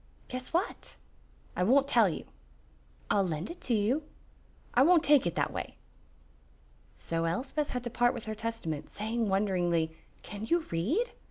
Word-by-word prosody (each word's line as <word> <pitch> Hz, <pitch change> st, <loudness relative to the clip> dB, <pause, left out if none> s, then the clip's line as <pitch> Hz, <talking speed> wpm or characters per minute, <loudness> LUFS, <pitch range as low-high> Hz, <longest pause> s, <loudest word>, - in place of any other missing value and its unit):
"Guess 255 Hz, 0 st, -5 dB
what?" 350 Hz, +6 st, -2 dB, 0.6 s
"I -, -, -1 dB
won't 265 Hz, +9 st, +4 dB
tell 230 Hz, -7 st, +5 dB
you." 160 Hz, -, -5 dB, 0.9 s
"I'll 205 Hz, -, +4 dB
lend 170 Hz, -, -2 dB
it 345 Hz, -, -11 dB
to 240 Hz, -, 0 dB
you." 225 Hz, +8 st, +2 dB, 0.7 s
"I 245 Hz, -, +5 dB
won't 335 Hz, +3 st, +6 dB
take 290 Hz, -9 st, +5 dB
it 170 Hz, -, -2 dB
that -, -, 0 dB
way." -, -, -5 dB, 1.2 s
So 165 Hz, 0 st, -1 dB
Elspeth 265 Hz, -, -1 dB
had 250 Hz, -1 st, -3 dB
to 240 Hz, -, -4 dB
part 245 Hz, +1 st, +2 dB
with 235 Hz, -, -6 dB
her 220 Hz, -, -3 dB
Testament, 215 Hz, -9 st, -4 dB
saying 220 Hz, +1 st, -2 dB
wonderingly, 175 Hz, -5 st, +1 dB, 0.3 s
"Can 205 Hz, +1 st, -6 dB
you 340 Hz, +6 st, +3 dB
read?" 265 Hz, -, 0 dB
225 Hz, 160 wpm, -30 LUFS, 180-265 Hz, 1.2 s, won't